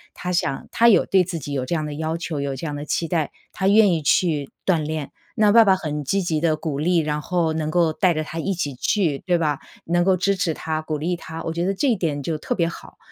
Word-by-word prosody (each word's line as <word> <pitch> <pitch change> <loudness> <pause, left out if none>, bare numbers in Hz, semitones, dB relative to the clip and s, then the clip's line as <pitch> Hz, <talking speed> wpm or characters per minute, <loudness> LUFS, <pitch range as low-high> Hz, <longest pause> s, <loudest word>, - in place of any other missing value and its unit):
他 180 - -4
想 135 -5 -1
他 235 +1 +5
有 215 - +5
对 190 -2 +3
自 170 -1 -4
己 145 0 -6
有 135 -2 -1
这 170 - -1
样 155 -2 -1
的 150 - -5
要 160 +2 -2
求， 165 -4 -4
有 140 -1 -2
这 165 - -6
样 145 - -4
的 145 - -5
期 165 +2 -1
待， 160 -3 -1 0.2
他 190 - -1
愿 205 -2 +6
意 160 - -1
去 150 -1 +1 0.2
锻 175 -4 +2
炼。 155 -1 -4 0.3
那 210 -1 +5
爸 230 0 +8
爸 195 -3 +5
很 150 -5 -3
积 195 +8 0
极 160 -4 -1
地 160 -2 +2
鼓 155 -3 -3
励， 175 +3 +2
然 150 -2 0
后 170 -2 0
能 155 -1 -2
够 170 -2 +2
带 180 +2 +2
着 155 -1 -2
他 160 +2 -6
一 195 +4 -1
起 145 -7 -3
去， 155 - 0
对 175 -2 +1
吧？ 150 -4 0 0.3
能 175 +1 +2
够 190 0 +3
支 195 +2 +1
持 175 -3 0
他、 155 0 -3
鼓 155 -1 -3
励 170 +4 -1
他， 165 -1 -8
我 165 - -3
觉 170 +1 -1
得 195 - +1
这 275 +9 0
一 235 - +3
点 155 -6 -2
就 155 +2 -2
特 - - -3
别 170 -3 +1
好。 170 - -9
165 Hz, 295 characters per minute, -22 LUFS, 150-180 Hz, 0.3 s, 爸